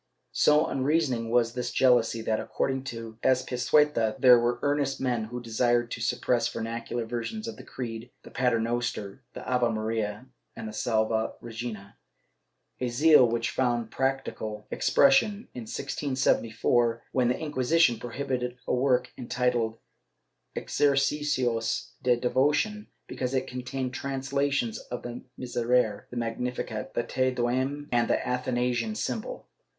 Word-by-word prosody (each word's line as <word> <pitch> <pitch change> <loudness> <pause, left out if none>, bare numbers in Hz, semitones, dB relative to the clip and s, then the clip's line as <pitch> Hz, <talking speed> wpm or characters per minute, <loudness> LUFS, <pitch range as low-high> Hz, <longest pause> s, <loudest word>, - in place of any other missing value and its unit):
^ - - -51 0.3
So 150 +1 +4
unreasoning 135 -4 0
was 115 -1 +2
this 125 0 -3
jealousy 120 -3 +3
that, 110 -1 0
according 135 0 -2
to 115 -2 -7
Azpilcueta, 130 -2 +2
there 125 -2 +8
were 120 +1 +1
earnest 145 -1 0
men 120 -4 0
who 120 +3 -6
desired 120 0 +1
to - - -4
suppress 120 -1 +1
vernacular 115 +1 -4
versions 120 - -4
of 225 - -5
the - - -11
Creed, 115 -1 -6
the - - -13
Paternoster, 120 -3 -1
the - - -8
Ave 125 -2 +2
Maria 110 0 -2 0.3
and - - -6
the 110 - -7
Salve 110 0 0
Regina, 110 -4 -7 0.8
a 125 - -1
zeal 140 +2 +6
which 115 0 -1
found 120 -3 0
practical 130 -5 -2
expression, 200 - +3
in 120 -2 -7
1674, 120 -3 0
when 125 -2 +2
the 125 - +1
Inquisition 145 -3 +2
prohibited 125 0 -3
a - - -1
work 125 0 +2
enti 125 0 0
tled 115 -2 -1 0.8
Exercicios 135 -4 +1
de 125 -2 +3
Devocion 145 - +1 0.2
because 130 +1 -3
it 130 - +1
contained 125 +1 -4
translations 135 -2 -1
of 125 - -7
the 120 0 -6 0.2
Miserere, 120 -3 0
the 125 - -7
Magnificat, 115 -1 -3
the 120 - +1
Te 130 +2 0
Deum 130 +4 -1
and 120 -1 +2
the - - 0
Athanasian 125 - 0
Symbol. - - -4
125 Hz, 135 wpm, -28 LUFS, 115-135 Hz, 0.8 s, there